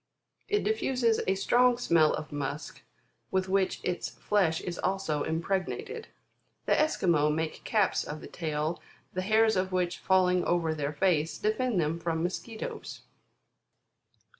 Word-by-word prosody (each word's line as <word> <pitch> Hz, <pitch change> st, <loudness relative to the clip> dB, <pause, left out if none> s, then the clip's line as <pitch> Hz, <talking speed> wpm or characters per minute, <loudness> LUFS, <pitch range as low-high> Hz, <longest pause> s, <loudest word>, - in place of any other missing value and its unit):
It 415 Hz, 0 st, +1 dB
diffuses 255 Hz, -, +1 dB
a 190 Hz, -, +3 dB
strong 245 Hz, +5 st, +3 dB
smell 165 Hz, -10 st, +3 dB
of 155 Hz, 0 st, -7 dB
musk 145 Hz, +1 st, -5 dB, 0.5 s
with 190 Hz, 0 st, 0 dB
which 190 Hz, 0 st, +1 dB
its 180 Hz, -1 st, -2 dB
flesh 185 Hz, -6 st, +1 dB
is 175 Hz, -1 st, -5 dB
also 190 Hz, -6 st, -1 dB
impregnated. 195 Hz, -, -2 dB, 0.6 s
The -, -, +3 dB
Esquimaux 170 Hz, -, +2 dB
make 160 Hz, +1 st, -2 dB
caps 210 Hz, -3 st, +2 dB
of 150 Hz, +1 st, -6 dB
the -, -, -10 dB
tail, 155 Hz, 0 st, -3 dB, 0.3 s
the 185 Hz, -, -1 dB
hairs 220 Hz, +2 st, +3 dB
of 185 Hz, 0 st, 0 dB
which 180 Hz, -1 st, -1 dB
falling 180 Hz, -1 st, +3 dB
over 170 Hz, -2 st, +1 dB
their 150 Hz, -1 st, -3 dB
face, 160 Hz, -2 st, +1 dB
defend 220 Hz, 0 st, 0 dB
them 160 Hz, +1 st, 0 dB
from 165 Hz, -1 st, -1 dB
mosquitoes. 220 Hz, +5 st, -5 dB
185 Hz, 140 wpm, -29 LUFS, 160-215 Hz, 0.6 s, a